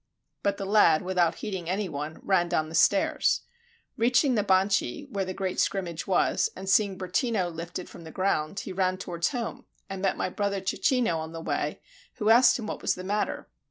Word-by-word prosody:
But 200 Hz, 0 st, 0 dB
the 195 Hz, -, -4 dB
lad, 195 Hz, -6 st, +4 dB
without 180 Hz, -2 st, +1 dB
heeding 190 Hz, -6 st, -5 dB
any 195 Hz, +2 st, -1 dB
one, 150 Hz, 0 st, -5 dB
ran 175 Hz, -3 st, +2 dB
down 155 Hz, -1 st, 0 dB
the -, -, -10 dB
stairs. 195 Hz, +5 st, +3 dB, 0.6 s
Reaching 250 Hz, +4 st, +3 dB
the 210 Hz, -3 st, +1 dB
Banchi, 195 Hz, +9 st, +1 dB
where 200 Hz, -3 st, -1 dB
the 185 Hz, -, -4 dB
great 190 Hz, -1 st, -2 dB
scrimmage 175 Hz, -4 st, -1 dB
was, 185 Hz, -2 st, +2 dB
and 190 Hz, +1 st, -8 dB
seeing 195 Hz, 0 st, +3 dB
Bertino 185 Hz, +1 st, 0 dB
lifted 170 Hz, +2 st, -6 dB
from 170 Hz, -, -12 dB
the 160 Hz, -, -9 dB
ground, 185 Hz, -1 st, -1 dB
he 190 Hz, -, -7 dB
ran 185 Hz, 0 st, 0 dB
towards 170 Hz, -2 st, -2 dB
home, 240 Hz, -3 st, -5 dB, 0.3 s
and 195 Hz, -1 st, -5 dB
met 195 Hz, -, 0 dB
my -, -, -1 dB
brother 200 Hz, +1 st, -1 dB
Cecchino 225 Hz, -, +1 dB
on 160 Hz, +1 st, -6 dB
the 165 Hz, -, -6 dB
way, -, -, -2 dB, 0.3 s
who 215 Hz, -1 st, +2 dB
asked 245 Hz, +2 st, +6 dB
what 215 Hz, -, -5 dB
was -, -, +1 dB
the 185 Hz, -, -7 dB
matter. 205 Hz, +3 st, -2 dB
190 Hz, 195 wpm, -27 LUFS, 175-205 Hz, 0.6 s, asked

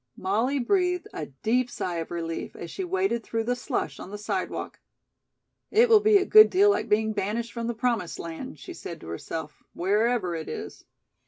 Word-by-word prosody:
Molly 225 Hz, +9 st, 0 dB
breathed 360 Hz, +6 st, +1 dB
a 150 Hz, -, -5 dB
deep 230 Hz, -, 0 dB
sigh 180 Hz, -7 st, -3 dB
of 165 Hz, -, -4 dB
relief 165 Hz, -1 st, -4 dB
as 170 Hz, -, -8 dB
she 385 Hz, -, -4 dB
waded 375 Hz, -10 st, 0 dB
through 225 Hz, +1 st, -2 dB
the 245 Hz, +2 st, 0 dB
slush 245 Hz, -, -3 dB
on -, -, -8 dB
the 205 Hz, -, -6 dB
sidewalk. 205 Hz, -, -4 dB, 0.9 s
"It 460 Hz, +3 st, +5 dB
will 445 Hz, -2 st, +8 dB
be 420 Hz, 0 st, +5 dB
a 385 Hz, -, +1 dB
good 430 Hz, +1 st, +8 dB
deal 400 Hz, +2 st, +5 dB
like -, -, -1 dB
being 220 Hz, +1 st, +2 dB
banished 210 Hz, +3 st, -2 dB
from 230 Hz, 0 st, -3 dB
the 235 Hz, -, -2 dB
promised 230 Hz, -7 st, -1 dB
land," 170 Hz, +12 st, -7 dB
she 360 Hz, -, -9 dB
said 170 Hz, -, -8 dB
to -, -, -11 dB
herself, 150 Hz, -, -6 dB
"wherever 205 Hz, +1 st, +1 dB
it 160 Hz, -1 st, -5 dB
is." -, -, -7 dB
230 Hz, 190 wpm, -26 LUFS, -, 0.9 s, will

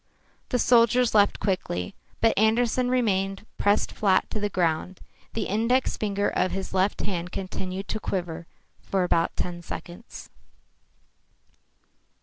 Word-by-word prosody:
The 250 Hz, -, +1 dB
soldiers 240 Hz, 0 st, +4 dB
left 205 Hz, -2 st, +4 dB
quickly. 90 Hz, -, -2 dB, 0.3 s
But 225 Hz, -1 st, +4 dB
Andersen 235 Hz, +3 st, +2 dB
remained 195 Hz, -5 st, 0 dB
pressed 205 Hz, +1 st, +2 dB
flat 195 Hz, -3 st, +2 dB
to 215 Hz, -, -2 dB
the 205 Hz, 0 st, -1 dB
ground. 175 Hz, 0 st, -1 dB, 0.4 s
The 225 Hz, -, 0 dB
index 230 Hz, +6 st, +1 dB
finger 205 Hz, -1 st, -1 dB
of 185 Hz, -, +1 dB
his 190 Hz, 0 st, -5 dB
left 190 Hz, +2 st, +1 dB
hand 180 Hz, -3 st, -3 dB
continued 190 Hz, 0 st, -5 dB
to 220 Hz, -, -2 dB
quiver 175 Hz, -5 st, -4 dB, 0.3 s
for 190 Hz, -2 st, 0 dB
about 170 Hz, -2 st, +1 dB
ten 175 Hz, -1 st, -3 dB
seconds. 175 Hz, +5 st, -9 dB
195 Hz, 130 wpm, -26 LUFS, 185-225 Hz, 0.4 s, soldiers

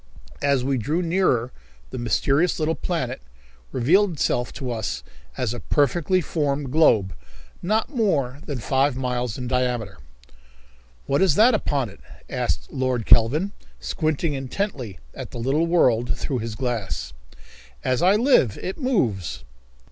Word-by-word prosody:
As 140 Hz, -3 st, +2 dB
we 135 Hz, -1 st, 0 dB
drew 155 Hz, +10 st, -1 dB
nearer 165 Hz, -9 st, +1 dB, 0.4 s
the -, -, -5 dB
mysterious 135 Hz, +8 st, +1 dB
little 155 Hz, 0 st, +1 dB
planet 165 Hz, -, -3 dB, 0.5 s
revealed 180 Hz, -, +3 dB
itself 125 Hz, -5 st, 0 dB
to 130 Hz, -4 st, -4 dB
us 110 Hz, -3 st, -3 dB, 0.3 s
as 120 Hz, -2 st, -1 dB
a 120 Hz, -, -5 dB
perfectly 155 Hz, +8 st, +1 dB
formed 145 Hz, -4 st, -1 dB
globe 110 Hz, -, +4 dB, 0.5 s
not 215 Hz, -, 0 dB
more 145 Hz, -, 0 dB
than 145 Hz, -4 st, -3 dB
five 135 Hz, +3 st, +1 dB
miles 125 Hz, -3 st, -2 dB
in 125 Hz, -, -4 dB
diameter. 120 Hz, -, -1 dB, 1.1 s
"What 140 Hz, -, +1 dB
is 185 Hz, -6 st, +4 dB
that 235 Hz, +4 st, +6 dB
upon 140 Hz, -, 0 dB
it?" 100 Hz, -, -15 dB, 0.3 s
asked -, -, -2 dB
Lord 130 Hz, -3 st, -1 dB
Kelvin, 120 Hz, -, +4 dB, 0.3 s
squinting 155 Hz, -1 st, -1 dB
intently 135 Hz, -, -3 dB, 0.2 s
at -, -, -7 dB
the -, -, -9 dB
little 135 Hz, +8 st, +1 dB
world 125 Hz, -9 st, +2 dB
through 130 Hz, -3 st, -2 dB
his 115 Hz, -1 st, -4 dB
glass. 110 Hz, -, -3 dB, 0.7 s
"As 130 Hz, -1 st, +1 dB
I 185 Hz, +3 st, +5 dB
live, 215 Hz, -, +3 dB
it 190 Hz, -, -5 dB
moves." 120 Hz, -, -1 dB
135 Hz, 140 wpm, -23 LUFS, 120-165 Hz, 1.1 s, that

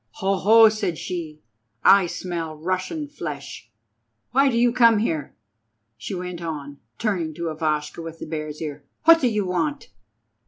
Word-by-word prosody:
"Ho, 195 Hz, +1 st, 0 dB
ho!" 225 Hz, +4 st, +7 dB
said 205 Hz, -6 st, -1 dB
she, 160 Hz, -4 st, -6 dB, 0.4 s
"I 195 Hz, -2 st, +6 dB
smell 170 Hz, -3 st, -4 dB
Russian 185 Hz, -, -3 dB
flesh. 150 Hz, -, -7 dB, 0.6 s
Why 275 Hz, +3 st, +4 dB
do 235 Hz, -, 0 dB
you 240 Hz, 0 st, +3 dB
come 230 Hz, -3 st, +5 dB
here?" 160 Hz, -9 st, -2 dB, 0.6 s
she 195 Hz, -, -6 dB
went 180 Hz, -1 st, -6 dB
on, 145 Hz, -4 st, -6 dB, 0.2 s
turning 175 Hz, -8 st, -2 dB
to 170 Hz, -1 st, -3 dB
Ivashka 155 Hz, 0 st, -2 dB
with 165 Hz, 0 st, -8 dB
the -, -, -7 dB
Bear's 155 Hz, -1 st, -5 dB
Ear. 145 Hz, -2 st, -6 dB, 0.2 s
"What 330 Hz, +1 st, +7 dB
do 255 Hz, -, +3 dB
you 210 Hz, -4 st, 0 dB
want?" 165 Hz, -5 st, -2 dB
175 Hz, 155 wpm, -23 LUFS, 155-215 Hz, 0.6 s, ho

